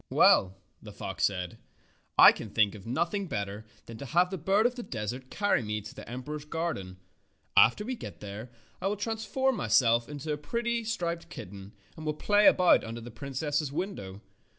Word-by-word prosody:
"Well," 95 0 +5 0.3
the 105 - -10
fox 95 -1 -2
said, 90 -3 -3 0.6
"I - - +10
can 110 - -7
think 105 -1 +2
of 105 -1 -11
noth 165 - -1
ing 200 -2 -2
better 105 -3 -4 0.2
than 115 -1 -10
to 140 - -7
have 175 +6 +2
the 190 - -3
bird 195 +7 +2
of 245 - +3
the 245 - -6
des 110 - -4
ert 130 0 -12
carry 205 -9 +1
me 105 -1 -3
to 110 - -10
the - - -10
emperor's 145 +5 -6
garden. 150 - -4 0.6
After 125 - +5
we 255 - -2
get - - -9
there 105 +4 -8 0.3
I 190 - 0
will 205 +1 -1
transform 225 +4 -1
myself 115 - +3
into 150 +1 -4
a - - -3
pretty, 235 +9 -2
striped 170 -6 -3
kitten, 100 - -9 0.2
and 160 - -9
will 155 -1 -2
play 205 +6 +4
about 180 -1 +5
under 115 +1 -6
the 120 +1 -9
princess's 140 +4 -2
window. 120 - -5
140 Hz, 195 wpm, -29 LUFS, -, 0.6 s, I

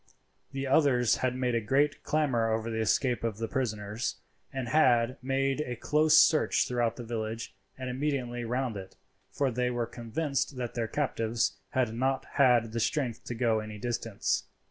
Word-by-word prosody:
The 135 0 -3
others 130 -4 +3
had 130 -1 0
made 125 -1 0
a 115 - +1
great 145 +6 +1
clamour 130 -7 +1
over 110 +1 -1
the 110 - -2
escape 120 +3 +1
of 115 -3 -2
the 115 0 -3
prisoners, 110 -2 -2 0.4
and 130 -3 -4
had 125 -4 +3
made 135 +2 0
a 125 -5 -3
close 150 +5 +3
search 155 -1 +4
throughout 120 -2 0
the 120 - -7
village 115 -1 -4 0.2
and 130 0 -5
immediately 125 -2 -2
round 125 -1 -2
it, 95 -1 -9 0.3
for 140 -2 0
they 125 +1 0
were 120 -1 -1
convinced 135 +4 -3
that 120 -2 -4
their 115 -2 -2
captives 115 -3 -1
had 125 -5 +1
not 130 +3 0
had 120 -4 +4
the 115 - -2
strength 125 -1 -1
to 120 - -4
go 115 -2 +2
any 110 0 -7
distance. 115 -2 -2
125 Hz, 170 wpm, -29 LUFS, 115-135 Hz, 0.4 s, search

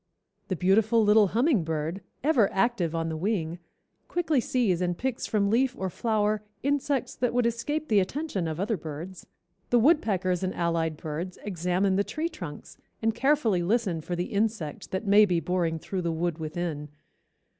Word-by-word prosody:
The 190 - -1
beautiful 215 +6 +3
little 210 0 +5
hummingbird, 180 - 0 0.2
ever 260 -9 +3
active 195 -6 +1
on 165 0 -1
the 160 - -3
wing, 170 -2 -2 0.5
quickly 325 -5 +1
sees 220 -9 +1
and 175 -1 0
picks 260 -1 -2
from 200 -2 +1
leaf 250 +2 +2
or 190 -1 -3
flower 215 -1 0 0.2
insects 280 -1 0
that 245 -1 0
would 245 -1 +3
escape 265 +7 -1
the 210 -2 +4
attention 200 - -2
of 160 0 -4
other 210 +2 0
birds. 160 +4 -8 0.4
The 245 - +4
woodpeckers 210 - +2
and 185 0 -2
allied 165 -2 0
birds 165 +4 -5
examine 185 0 0
the 200 - +3
tree 315 +9 -3
trunks 175 - -9 0.2
and 225 0 +1
carefully 240 -6 +2
listen 190 -3 0
for 175 +3 -4
the 175 +3 -3
insect 205 -8 -2
that 190 +4 -3
may 205 +1 +7
be 180 -5 +2
boring 165 0 0
through 185 +3 -4
the 170 -1 -1
wood 165 0 -2
within. 155 -2 -4
195 Hz, 165 wpm, -27 LUFS, 170-230 Hz, 0.5 s, may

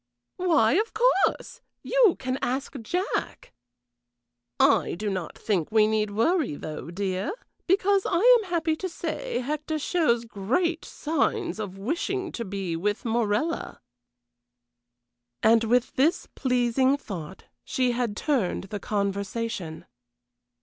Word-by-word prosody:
"Why, 320 -12 +3
of 445 - -2
course! 460 -3 +2 0.2
You - - +4
can 260 0 -3
ask 265 +3 -2
Jack." 360 - -3 1.1
"I - - +4
do 205 +3 -3
not 185 -3 -4
think 190 -6 -1
we 215 -1 +5
need 215 -1 +1
worry, 245 - +1
though, 155 +2 -7
dear, 190 - -2 0.3
because 390 +1 +3
I 350 - +2 0.2
am 390 - -9
happy 330 -2 +1
to 375 - -4
say - - -3
Hector 300 +4 -2
shows 290 -7 +1
great 270 - -1
signs 335 - -1
of 195 -3 -5
wishing 340 - -2
to 235 - -4
be 195 -4 -3
with 205 +7 -2
Morella." 235 +7 -1 1.6
And 225 +1 +5
with 245 +2 +2
this 305 +7 +2
pleasing 255 +1 +2
thought 190 - -8 0.2
she 255 -1 0
had 235 -3 -2
turned 260 - 0
the 205 - -2
conversation. 200 -3 -3
240 Hz, 120 wpm, -26 LUFS, 205-330 Hz, 1.6 s, we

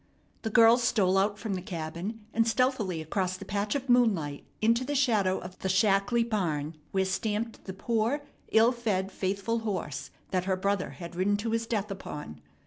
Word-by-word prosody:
The 220 - -2
girl 230 +2 +6
stole 210 -6 +2
out 200 +2 +2
from 215 -2 -3
the 185 - -2
cabin 175 +4 -5
and 225 0 +3
stealthily 225 -8 +1
across 185 +3 -1
the - - -9
patch 205 +2 -1
of 270 -1 -2
moonlight 200 - +2
into 230 +3 +3
the 290 +3 -2
shadow 215 -9 +3
of 180 +1 -9
the 190 - -2
shackly 200 +4 +3
barn 165 -8 -1 0.2
where 190 -1 +1
stamped 215 +3 -2
the 190 - -5
poor, 230 +7 0 0.3
ill 225 +2 +6
fed, 205 -6 -1
faithful 200 +5 -1
horse 195 -10 -3 0.2
that 185 -1 0
her 190 -1 +1
brother 200 0 0
had 170 -1 -8
ridden 200 +3 +2
to 220 +2 -2
his 230 0 -1
death 210 -3 -1
upon. 150 - -7
205 Hz, 180 wpm, -29 LUFS, 185-230 Hz, 0.3 s, girl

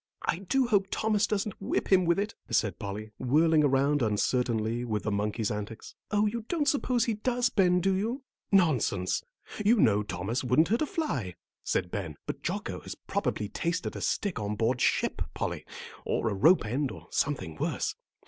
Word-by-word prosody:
"I - - 0
do 250 +8 +1
hope 205 -5 +2
Thomas 215 0 +1
doesn't 205 -1 -2
whip 195 - -1
him 185 -2 +5
with 170 0 +3
it," 205 +2 -1 0.2
said 105 -5 +1
Polly, 105 +1 -5
whirling 155 +4 +4
around 140 +1 +3
uncertainly 115 +1 0
with 110 -4 -2
the 110 - -1
monkey's 105 +2 -1
antics. 105 +1 -6 0.2
"Oh, 210 0 +2
you 225 +2 -2
don't 315 -4 0
suppose 255 -4 +2
he 230 - 0
does, 245 +3 0
Ben, 180 -3 +4
do 195 +2 +2
you?" 230 +8 -2 0.3
"Nonsense; 135 - +2 0.4
you 215 +4 +5
know 105 - +4
Thomas 105 +5 -3
wouldn't 135 +7 +3
hurt 230 +3 +2
a 310 - +1
fly," 130 - -2 0.3
said 90 - -1
Ben. 80 -8 -4
"But - - -5
Jocko - - -3
has - - -8
probably 105 - -2
tasted 170 - -2
a - - -5
stick 200 - -1
on 105 0 -2
board 115 +3 0
ship, - - +1
Polly, - - -3 0.4
or 115 - 0
a - - 0
rope 155 - +5
end, 130 +6 -1
or - - -10
something 105 - -1
worse. - - -1
145 Hz, 180 wpm, -29 LUFS, -, 0.4 s, him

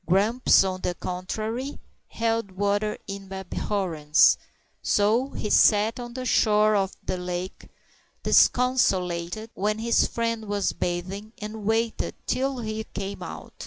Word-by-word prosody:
Grumps, 210 +8 +4
on 185 -1 -3
the 180 - -2
contrary, 220 +10 -4 0.3
held 225 -3 -1
water 205 +2 0
in 195 -1 -8
abhorrence; 180 -5 +2 0.5
so 220 +6 +2
he 215 - -4
sat 215 +3 +4
on 240 0 -7
the 255 -1 -4
shore 215 -2 +3
of 195 -2 +1
the 185 - -2
lake 180 +1 -5 0.5
disconsolate 205 -5 +2
when 210 +2 -1
his 230 +1 +2
friend 230 -1 -2
was 205 -1 0
bathing, 190 +5 -4
and 210 0 -6
waited 225 +1 0
till 270 +1 -1
he 215 0 -3
came 200 0 -5
out. - - -8
210 Hz, 125 wpm, -25 LUFS, 190-225 Hz, 0.5 s, Grumps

